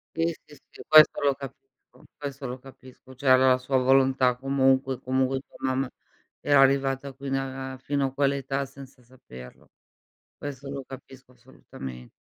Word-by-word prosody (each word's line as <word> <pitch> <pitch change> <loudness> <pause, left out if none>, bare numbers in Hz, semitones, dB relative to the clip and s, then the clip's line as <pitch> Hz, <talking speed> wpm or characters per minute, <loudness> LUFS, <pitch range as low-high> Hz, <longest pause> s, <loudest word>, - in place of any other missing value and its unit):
Sì, 165 0 +1 0.2
sì, - - -16
sì - - -13
questo 155 -1 +7
lo 140 -1 +3
capisco, 135 -2 -14
questo 140 -1 -6
lo 125 +1 -6
capisco, 130 0 -16
cioè 130 +1 0
aveva 130 0 +6
la 130 - +2
sua 130 +1 0
volontà 130 -1 +3
comunque; 135 -1 +1
comunque 130 +1 0
tua - - -19
mamma 130 0 -1 0.5
era 145 -1 +4
arrivata 135 0 +2
fino 135 0 -3 0.3
a 130 - -10
fino 140 +1 -1
a - - -11
quell'età 140 0 -1
senza 135 -1 -14
saperlo. 65 - -14 0.7
Questo 140 -1 -7
lo 140 -1 -5
capisco 130 -1 -13
assolutamen 65 - -11
135 Hz, 150 wpm, -26 LUFS, 130-140 Hz, 0.7 s, questo